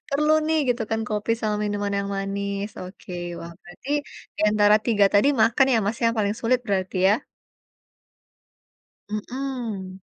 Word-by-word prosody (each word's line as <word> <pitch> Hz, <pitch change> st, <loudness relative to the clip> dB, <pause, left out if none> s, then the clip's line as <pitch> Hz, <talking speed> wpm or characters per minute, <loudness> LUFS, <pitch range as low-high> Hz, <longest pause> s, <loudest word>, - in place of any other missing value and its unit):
Perlu 300 Hz, +2 st, +2 dB
nih 320 Hz, 0 st, +2 dB
gitu 235 Hz, -2 st, +1 dB
kan, 225 Hz, -, 0 dB
kopi 215 Hz, +2 st, -1 dB
sama 210 Hz, -2 st, 0 dB
minuman 205 Hz, -1 st, -2 dB
yang 200 Hz, 0 st, -2 dB
manis. 200 Hz, +1 st, -3 dB
Oke, 185 Hz, 0 st, -10 dB, 0.3 s
wah, 170 Hz, 0 st, -8 dB
berarti 175 Hz, +10 st, -13 dB, 0.5 s
di -, -, -6 dB
antara 210 Hz, 0 st, +5 dB
3 210 Hz, -4 st, +4 dB
tadi 205 Hz, +7 st, +5 dB
makan 240 Hz, +5 st, +4 dB
ya, -, -, +4 dB
Mas, 215 Hz, +3 st, -2 dB
yang 230 Hz, 0 st, +3 dB
paling 205 Hz, 0 st, +1 dB
sulit 250 Hz, +2 st, +2 dB
berarti 190 Hz, -2 st, -1 dB
ya? -, -, +5 dB, 2.0 s
Mhm. 215 Hz, -4 st, -5 dB
210 Hz, 150 wpm, -24 LUFS, 200-235 Hz, 2.0 s, antara